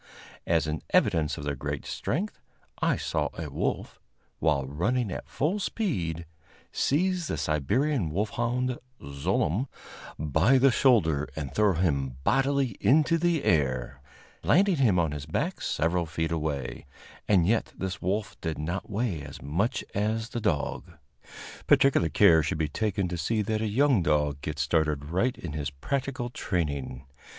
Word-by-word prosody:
As 80 -2 +2
an 75 -2 -3
evidence 75 -3 +2
of 75 - -6
their 70 0 -1
great 70 +1 -4
strength, 190 - -3 0.4
I - - +2
saw - - -1
a 80 -3 -5
wolf, - - -3 0.4
while 75 -5 +2
running 100 - -1
at - - -6
full 170 +9 0
speed, 90 - -2 0.5
seize 180 +3 +1
the - - -2
Siberian 100 - 0
wolfhound 120 +7 -1 0.2
Zlooem 75 - -1 0.5
by 80 - +3
the 135 +1 +5
shoulder 80 - +3
and 70 -4 -5
throw 105 +1 +3
him 70 -7 0
bodily 135 - +1
into 155 +4 +4
the 170 -3 +1
air, 65 -7 0 0.4
landing 195 -2 +3
him 115 -9 +3
on 80 -3 +2
his 75 0 -6
back 160 - -2
several 85 +1 0
feet 80 +1 -2
away, 75 -6 -3 0.4
and 95 -5 +4
yet 110 +4 +1
this 95 -1 -4
wolf 100 +4 -1
did 80 -2 -3
not 85 +5 -4
weigh 105 -6 -1
as - - -9
much 100 - -1
as 110 +3 -1
the 120 - -4
dog. 85 0 -1 0.7
Particular 135 -12 +4
care 80 0 +6
should 75 +1 -2
be 80 -1 0
taken 100 +4 -1
to 85 -1 -4
see 105 +6 0
that 110 +1 -1
a 110 - 0
young 130 0 +3
dog 75 -3 +1
gets 75 -2 -2
started 75 -1 +1
right 120 +9 +1
in 80 -4 -6
his 75 -2 -2
practical 125 - -3
training. 70 - -3
90 Hz, 150 wpm, -27 LUFS, 75-120 Hz, 0.7 s, care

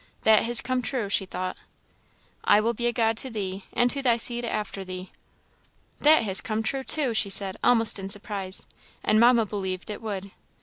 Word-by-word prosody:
"That 220 -1 +5
has 240 +1 +6
come 255 0 -2
true," 245 -5 -3
she 195 -1 0
thought. 185 0 -5 0.9
"I 205 - +4
will 230 +2 0
be 240 +1 -2
a - - +1
God 225 -1 0
to 260 - -3
thee, 195 -4 -5
and 245 0 +2
to 280 - -3
thy 240 -3 +2
seed 240 +1 0
after 210 -4 -4
thee." 185 0 -8 0.9
"That 305 -3 +5
has 195 -2 +5
come 220 -1 -3
true, 265 +4 -2
too!" 270 -4 0
she 215 -2 +2
said, 195 -1 +2
almost 230 -4 +3
in 195 0 -6
surprise 195 -2 -1 0.4
"and 215 - +2
Mamma 235 -1 +4
believed 190 -1 -5
it 210 - -8
would." 200 -3 -6
215 Hz, 190 wpm, -25 LUFS, 195-240 Hz, 0.9 s, has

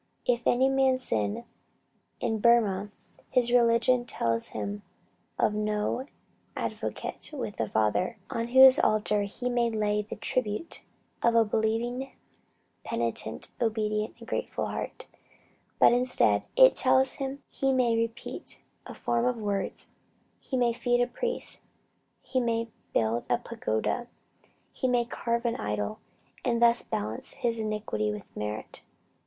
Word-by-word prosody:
"If 240 -1 +1
any 255 +2 +4
man 270 -1 +3
sin" 110 - -2 0.7
in 225 -2 -1
Burmah, 210 -4 +3 0.4
his 240 -1 +3
religion 240 +1 +4
tells 115 - -1
him 100 -1 -4 0.6
of - - +2
no 210 +5 -1 0.5
"advocate - - -4
with 265 -8 -5
the 110 -2 -2
Father" 110 - +1
on 230 0 -3
whose 260 +1 +8
altar 210 -1 +2
he 205 +5 -4
may 240 -1 +1
lay 210 -1 0
the 210 - -7
tribute 250 +5 -2 0.4
of 235 0 +3
a 230 -1 +5
believing, 230 +5 -1 0.7
penitent, - - -1
obedient 215 -2 -1
and 230 -1 -13
grateful - - -2
heart; - - -5 0.7
but - - +6
instead, 250 +1 +3
it - - +7
tells 260 0 +6
him 275 0 -5
he 270 0 0
may 250 -3 +2
repeat 230 0 -4 0.3
a - - -9
form 235 0 0
of 250 -1 +1
words, 200 -3 -3 0.5
he 260 - -4
may 240 -1 +2
feed 245 +1 +1
a 245 - +4
priest, 475 - -3 0.6
he 260 - -1
may 230 -1 -1 0.2
build 115 +1 0
a - - +3
pagoda, 235 - -2 0.7
he 260 - -1
may 245 -1 +2
carve 235 0 -2
an 235 - 0
idol, 105 0 -3 0.4
and 235 -2 +1
thus 235 0 +5
balance 105 +2 -4
his 230 -1 -1
iniquity 210 - -2
with 105 - -7
merit. 105 +1 -5
230 Hz, 135 wpm, -28 LUFS, 210-245 Hz, 0.7 s, whose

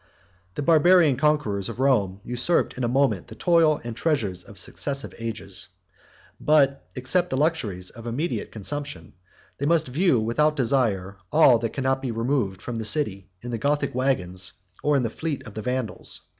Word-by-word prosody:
The - - -2
Barbarian 165 -1 +5
conquerors 130 -9 +1
of - - -7
Rome 105 -8 +2
usurped 125 +8 +1
in 130 - -4
a - - +2
moment 135 +3 +1
the - - -10
toil 165 -4 +3
and 120 -1 -5
treasure 125 - 0
of - - -12
successive 140 -1 -4
ages; 105 -4 -4 0.7
but, 140 -3 +3
except 175 +8 0
the 130 - -1
luxuries 110 - -1
of 115 -1 -10
immediate 145 +9 -2
consumption, 110 - -5 0.5
they 140 - 0
must 160 -4 +2
view 145 -1 +3
without 150 +8 +1
desire 115 -8 0
all 135 -7 +6
that 115 -1 -3
could 135 - -3
not 135 0 +1
be 135 - -3
removed 115 -5 -1
from 120 -2 -4
the 110 - -3
city 105 -7 0
in 120 - -5
the 115 - -3
Gothic 145 +2 0
wagons 95 -10 0 0.3
or 145 -1 +2
the 120 - 0
fleet 150 +5 -4
of 110 - -9
the 110 - -5
Vandals. 125 0 -3
130 Hz, 170 wpm, -25 LUFS, 110-150 Hz, 0.7 s, all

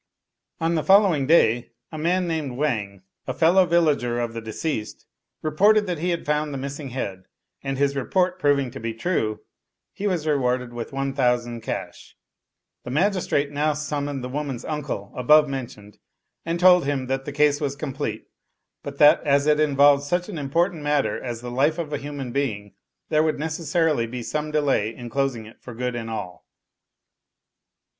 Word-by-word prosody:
On 165 +1 0
the 160 -2 0
following 190 -8 +4
day, 120 -7 +3 0.2
a 155 - -6
man 180 +3 +1
named 150 -7 -3
Wang, 105 -10 -2 0.2
a - - -3
fellow 180 +3 +4
vil 170 0 +4
lager 125 -6 0
of 120 -1 -2
the 115 - -5
deceased, 110 +1 -4 0.4
reported 205 +8 +4
that 175 -5 -3
he 175 +3 -1
had 170 -1 -2
found 150 0 0
the 140 - -4
miss 140 +2 -5
ing 140 -3 -6
head; 100 -7 -5 0.4
and 135 -1 -3
his 140 0 +1
report 180 +7 0
proving 140 -5 +2
to 135 - -8
be 115 0 -4
true, 110 -6 -1 0.5
he 205 - -3
was 175 -5 -1
re 150 -1 +2
warded 125 -2 -1
with 120 -1 -6
1,000 125 -4 0
cash. - - -6 0.7
The - - -7
magistrate 155 -2 +1
now 150 +1 +1
summoned 145 -2 -3
the 125 - -4
woman's 135 -3 -4
uncle 145 -10 -4
above 150 +4 +5
mentioned, 115 -6 -7 0.5
and 170 +1 -1
told 180 -2 +6
him 140 -2 -1
that 135 +1 -2
the 145 - -4
case 145 +1 +2
was 140 -2 -1
complete, 140 -2 -4 0.6
but 140 0 -8
that 150 0 +6
as 140 0 +2
it 150 0 +3
involved 145 -1 +5
such 175 +5 -1
an 175 -7 -5
important 165 +4 0
matter 145 -1 0
as 120 -2 -5
the 120 0 -6
life 145 +6 +2
of 155 -3 -4
a 145 - -1
human 140 -3 -6
being, 110 -7 -2 0.4
there 155 - +3
would 155 -1 +1
necessarily 160 -4 0
be 120 +1 -6
some 150 +4 -3
delay 140 -8 0
in 120 -1 -9
closing 135 -5 -1
it 110 - -15
for 120 - -10
good 125 +1 -3
and 115 -1 -5
all. 90 -5 -6
140 Hz, 180 wpm, -24 LUFS, 125-155 Hz, 0.7 s, told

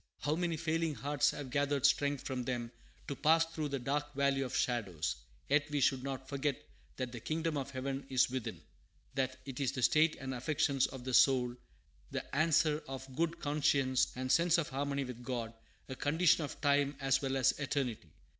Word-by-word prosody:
How 150 +1 +1
many 170 -1 -1
failing 165 -1 0
hearts 145 -1 +1
have 135 -3 -6
gathered 140 0 +1
strength 145 -1 +2
from 130 -2 -2
them 120 -2 -3 0.4
to 140 - -3
pass 160 +4 +4
through 160 -2 -4
the 140 - -1
dark 145 +3 -2
valley 140 -1 +2
of 130 -2 -2
shadows! 95 - -1 0.3
Yet 145 +1 +2
we 145 -1 0
should 135 -1 +3
not 135 0 -5
forget 140 -1 -1 0.4
that 130 -2 -3
"the 120 - -6
kingdom 160 +5 -2
of 140 -1 -3
heaven 135 +1 -4
is 130 -2 +4
within;" 130 -2 -4 0.5
that 130 -1 -1
it 135 -2 -6
is 135 -3 0
the 130 - -3
state 155 +4 +4
and 135 -1 -5
affections 135 +1 +1
of 130 -2 -9
the 130 0 -4
soul, 125 -2 +4 0.5
the - - -5
answer 155 0 +3
of 135 0 -6
a - - -14
good 165 +4 -1
conscience, 140 -4 +2
the 130 +1 -5
sense 170 0 +4
of 170 - -1
harmony 140 +1 -1
with 125 -2 -7
God, 120 -3 -3 0.3
a 130 - -5
condition 160 +4 +3
of 145 - -6
time 145 -1 +2
as 135 -1 +2
well 135 -1 -1
as 130 0 +4
of - - -12
eternity. 130 - -2
140 Hz, 195 wpm, -33 LUFS, 130-150 Hz, 0.5 s, pass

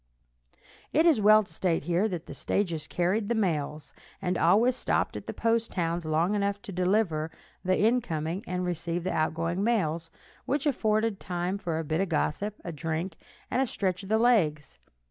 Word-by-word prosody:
It 315 +3 +3
is 315 -10 +5
well 215 +1 +7
to 175 - -14
state 170 0 0
here 175 +6 +1
that 175 -5 -5
the - - -8
stages 170 -6 -1
carried 190 +5 0
the 235 - +2
mails, 155 -7 -1 0.3
and 185 -2 -1
always 215 +10 +4
stopped - - 0
at - - -7
the - - -2
post 230 0 0
towns 170 -2 -1
long 160 +5 +1
enough 200 0 0
to - - -7
deliver 180 -4 +1 0.3
the 185 0 +2
incoming 190 -6 0
and 180 0 -2
receive 170 0 -2
the 185 - -1
outgoing 165 +4 0
mails, 170 -8 0 0.4
which 285 +3 0
afforded 220 -6 +1
time 180 +1 -2
for 170 -5 -2
a 165 - -2
bit 155 +3 -1
of 195 - -1
gossip, 190 +5 -1
a 170 - -3
drink, 165 +3 -3 0.4
and 255 - +2
a 265 - +1
stretch 185 -5 -1
of 195 - -10
the 220 - +4
legs. 160 - +2
180 Hz, 185 wpm, -28 LUFS, 165-215 Hz, 0.4 s, well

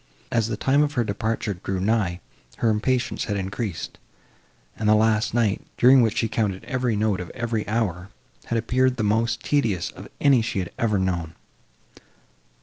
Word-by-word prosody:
As 115 -2 +1
the 110 -3 -3
time 135 +5 +3
of 150 -1 +1
her 120 - +1
departure 110 0 -2
drew 95 +1 -4
nigh, 95 -3 0 0.4
her 115 - +2
impatience 120 +4 0
had 100 - -2
increased, 95 0 -4 0.8
and 105 -1 0
the 110 - +6
last 110 +1 +2
night, 110 -4 +1 0.2
during 130 +1 +7
which 115 -1 +1
she 115 - +2
counted 105 -4 -1
every 125 -4 -1
note 105 -2 +1
of 90 - -6
every 115 -3 -2
hour, 100 -5 -1 0.4
had 115 - -1
appeared 125 +3 +1
the 110 - -1
most 115 +3 +1
tedious 115 -12 0
of - - -11
any 135 -4 +5
she 110 - -3
had 90 -3 -2
ever 110 -4 +2
known. 85 -4 -2
110 Hz, 170 wpm, -24 LUFS, 100-120 Hz, 0.8 s, during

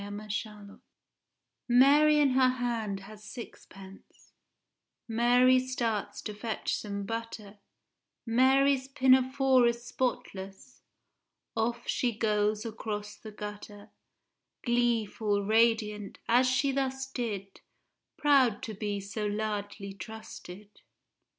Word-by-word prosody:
A 200 - -7
SKETCH 205 0 -6
IN 215 -1 -8
SEVEN 210 -1 -5
DIALS - - -16 0.9
Mary 290 +5 +6
in 290 -2 +4
her 255 0 +4
hand 230 -6 -2
has 210 +2 -12
sixpence, 195 -4 -12 0.7
Mary 245 +3 +4
starts 240 -5 -3
to 210 - -5
fetch 220 +1 -3
some 200 -1 -5
butter, 220 -2 -6 0.7
Mary's 265 +3 +3
pinafore 260 -1 +4
is 235 0 -2
spotless, 240 -4 -4 0.7
Off 230 +1 -1
she 240 -4 0
goes 210 0 +1
across 210 -2 -5
the 220 - -11
gutter, 210 0 -9 0.7
Gleeful, 225 -4 +1
radiant, 215 -2 +1
as 250 +2 +4
she 275 +2 +2
thus 265 0 -2
did, 215 -7 -5 0.6
Proud 270 -7 +3
to 220 - -5
be 205 0 -3
so 200 +2 -4
largely 205 -1 -4
trusted. 205 0 -11
225 Hz, 110 wpm, -29 LUFS, 205-255 Hz, 0.9 s, Mary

